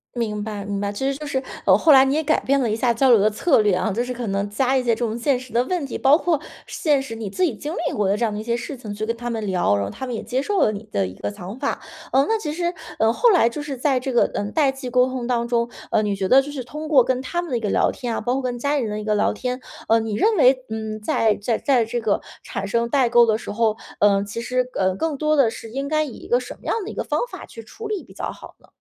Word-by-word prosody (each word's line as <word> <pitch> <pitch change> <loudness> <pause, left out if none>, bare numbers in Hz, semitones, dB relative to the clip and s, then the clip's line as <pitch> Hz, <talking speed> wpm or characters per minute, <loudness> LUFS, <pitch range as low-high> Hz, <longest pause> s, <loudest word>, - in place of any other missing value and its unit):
明 210 -3 -2
白 210 -2 -5
明 200 0 -3
白， 200 0 -2
其 205 +6 -5
实 270 - -5
就 300 - -7
是， 275 -3 -1 0.2
呃， 190 - +7
后 310 +10 +4
来 265 -2 +8
你 270 - +1
也 315 +2 +1
改 - - +2
变 275 0 +2
了 235 - +1
一 215 - 0
下 235 +1 +1
交 260 +3 +3
流 235 - +8
的 205 - +4
策 245 +2 +3
略 205 -3 +2
啊， 185 +4 0
就 230 +5 -1
是 250 0 -4
可 240 -2 -5
能 200 +1 -1
加 260 +5 +1
一 255 - 0
些 235 - +2
这 225 - -2
种 225 -1 -1
现 255 +1 +1
实 255 -1 -12
的 235 +2 +2
问 345 +3 -2
题， - - -4
包 275 +2 +5
括 335 -4 +1 0.3
现 295 -4 +1
实 235 -4 -7
你 220 -3 -5
自 - - -5
己 310 -10 +1
经 300 +9 -5
历 - - -2
过 205 -2 +1
的 195 - +2
这 220 - -2
样 220 - +1
的 210 - -4
一 - - -5
些 235 +1 0
事 240 +4 -5
情 215 -4 -7
去 215 +2 -4
跟 230 - -2
他 240 0 -4
们 225 -1 -3
聊， 180 - +2
然 100 - 0
后 100 - -3
他 260 - -6
们 250 - -4
也 225 - -3
接 245 +5 -2
受 390 +7 0
了 215 - +4
你 205 +1 -6
的 95 -2 0
一 95 - -9
个 100 +1 -4
想 185 - -8
法。 - - -2 0.3
呃， 270 +1 +4
那 450 - +3
其 300 -7 -4
实， 345 +2 -2 0.2
呃， 220 +1 +4
后 465 - +4
来 235 - +4
就 290 +5 -6
是 290 -2 -4
在 260 0 +1
这 260 +1 -4
个， 240 - +4
呃， 205 - -1
代 285 -4 +3
际 270 -1 -8
沟 250 +1 +4
通 255 -2 -4
当 235 -1 0
中， 235 -1 +1 0.2
呃， 215 - +2
你 205 -1 0
觉 190 -1 -1
得 265 +6 +6
就 290 - -7
是 275 -3 -5
通 305 +5 -7
过 280 -5 +6
跟 255 +1 0
他 345 +7 -2
们 350 - -7
的 245 - 0
一 - - -2
个 210 -2 -2
聊 - - +3
天 240 -2 -4
啊， - - -2
包 245 - 0
括 270 - -1
跟 245 -1 -3
家 285 +3 0
人 240 -6 -1
的 210 - -3
一 - - -5
个 210 0 +1
聊 205 - +2
天， 250 0 -3 0.3
呃， 225 0 +4
你 220 -1 -3
认 430 - +2
为， 255 0 +5
嗯， 220 -1 -4
在 215 0 +2
在 220 +2 -1
在 255 -5 +2
这 240 +2 -2
个 215 -3 0 0.2
产 200 - -4
生 235 +3 0
代 255 -1 +2
沟 240 0 +6
的 220 -1 +1
时 - - -6
候， 220 0 +1 0.2
呃， 200 -1 +4
其 205 +3 -5
实， 250 +1 -1
呃， 185 -1 +1
更 315 +4 -2
多 305 +1 +2
的 265 -6 +4
是 225 -1 -9
应 275 +2 -3
该 310 +1 +1
以 290 - -6
一 - - -12
个 245 - +3
什 250 - -8
么 - - -20
样 - - 0
的 405 - -6
一 - - -8
个 - - -3
方 - - -1
法 - - -9
去 230 - -11
处 440 - -8
理 420 -3 -3
比 - - -16
较 - - -4
好 - - -12
呢？ - - -23
240 Hz, 345 characters per minute, -22 LUFS, 215-270 Hz, 0.3 s, 来